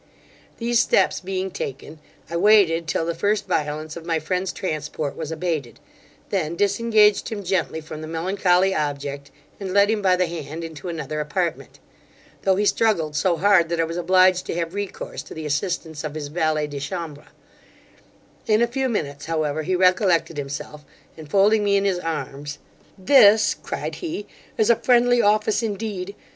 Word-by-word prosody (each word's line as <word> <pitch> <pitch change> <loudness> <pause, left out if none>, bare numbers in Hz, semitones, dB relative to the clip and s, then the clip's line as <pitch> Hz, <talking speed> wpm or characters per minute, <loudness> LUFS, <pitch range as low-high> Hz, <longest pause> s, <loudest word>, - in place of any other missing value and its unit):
These 235 0 +1
steps - - +2
being 190 0 -3
taken, 145 +1 -6 0.3
I 170 - -6
waited 175 -4 +4
till 165 0 -1
the 170 - -1
first 205 +5 0
violence 155 +1 -2
of 170 - -8
my 165 -1 0
friend's 180 +4 -2
transport 150 -4 -4
was 160 -1 -5
abated, 155 -8 -3 0.5
then 170 -4 -1
disengaged 210 +2 +3
him 210 -3 -5
gently 180 -3 -1
from 155 0 -8
the 155 - -6
melancholy 180 +3 +1
object, 145 -2 -3 0.3
and 195 -1 -5
led 200 +1 +5
him 220 -1 0
by 185 -2 +4
the 180 0 +1
hand 165 -1 -6
into 165 +1 -7
another 155 -2 -4
apartment; 165 +3 -3 0.6
though 190 -1 +2
he 205 +2 +1
struggled 175 -9 +1
so 170 +3 +1
hard, 185 -2 +4
that 170 -1 -1
I - - +3
was 165 +1 -4
obliged 185 +1 +3
to - - -3
have 170 0 -3
recourse 200 -1 -5
to - - -11
the 160 -1 -6
assistance 160 0 -2
of 155 -1 -5
his 145 -2 -5
valet 155 -1 0
de 145 -1 -6
chambre 150 0 -6 1.2
In 215 +1 +4
a - - +2
few 260 +2 -1
minutes, 145 -10 -3
however, 155 -2 -1
he 185 +4 -1
recollected 185 -2 +3
himself, 145 +1 -6 0.3
and 155 -2 -11
folding 205 +4 +4
me 200 -1 +3
in 200 - 0
his 190 -3 +1
arms, 150 -3 -5 0.4
'This 215 0 +6
(cried - - -4
he), 320 - -4 0.3
is 220 +1 +4
a - - +5
friendly 245 -1 +4
office, 215 +1 +2
indeed! 205 -3 -4
175 Hz, 170 wpm, -23 LUFS, 155-200 Hz, 1.2 s, This